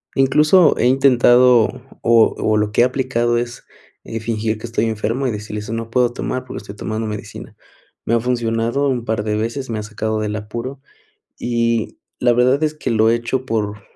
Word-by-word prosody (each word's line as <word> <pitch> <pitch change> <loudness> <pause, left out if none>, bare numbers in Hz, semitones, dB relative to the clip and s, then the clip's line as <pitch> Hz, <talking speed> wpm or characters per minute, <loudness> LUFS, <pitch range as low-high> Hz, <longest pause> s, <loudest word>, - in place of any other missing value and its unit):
Incluso, 150 +6 +4
he - - +1
intentado 125 -2 +5 0.4
o 115 -1 +4
o 110 0 +1
lo 105 0 0
que - - +2
he - - +7
aplicado 125 -2 0
es 120 0 -4 0.6
fingir 110 -1 -2
que - - -7
estoy 115 0 -1
enfermo 115 +4 -2
y - - 0
decirles: 105 0 -6
"No 115 0 -4
puedo 120 0 +1
tomar, 130 +1 -4
porque, - - -8
estoy 100 0 -10
tomando 110 +1 -4
medicina". 105 -1 -8 0.5
Me 115 - 0
ha 115 - +4
funcionado 120 +2 0
un 125 -3 -2
par 110 -2 -1
de 105 -1 -1
veces, 115 +5 -3
me 110 -2 -2
ha - - -5
sacado 110 +1 -3
del 105 0 -2
apuro 115 +6 -6 0.6
y 115 -1 -1 0.2
la 120 -1 +3
verdad 130 +5 +2
es 155 - 0
que 150 - -4
lo 110 0 +3
he - - +3
hecho 120 +2 -2
por 105 -2 -2
115 Hz, 190 wpm, -19 LUFS, 110-125 Hz, 0.6 s, he